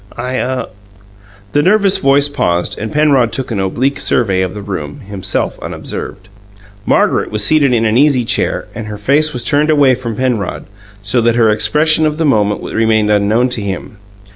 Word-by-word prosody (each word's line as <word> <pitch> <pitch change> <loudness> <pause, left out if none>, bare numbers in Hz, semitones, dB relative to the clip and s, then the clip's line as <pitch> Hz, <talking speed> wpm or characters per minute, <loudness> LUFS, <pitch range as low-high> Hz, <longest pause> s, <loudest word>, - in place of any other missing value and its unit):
I 130 +1 -3
ah 130 0 -2 0.4
" 100 0 -26
The 145 - +3
nervous 200 +3 +3
voice 140 +1 +3
paused, 90 -11 -1
and 110 0 -6
Penrod 140 -6 +2
took 130 -2 -4
an 105 - -2
oblique 125 +9 -1
survey 100 -6 +1
of 95 0 -3
the 105 - -7
room, 105 +8 -6
himself 100 -3 -3
unobserved. 95 0 -7 0.6
Margaret - - +1
was 105 -1 0
seated 145 -1 +3
in 115 -2 +1
an 110 +1 +2
easy 140 -4 +3
chair - - -1
and 110 -1 -7
her 105 0 -6
face 145 +9 +1
was 125 -3 -4
turned 150 +4 +1
away 145 -4 +4
from 120 -3 -4
Penrod, 120 -6 -2 0.4
so 120 +4 0
that 115 0 +2
her 115 -2 +3
expression 155 +8 +2
of 150 0 -3
the 165 - 0
moment 105 -7 +1
remained 110 -2 +1
unknown 105 +5 +2
to 120 -3 -2
him. 100 +1 -6
120 Hz, 185 wpm, -14 LUFS, 105-140 Hz, 0.6 s, away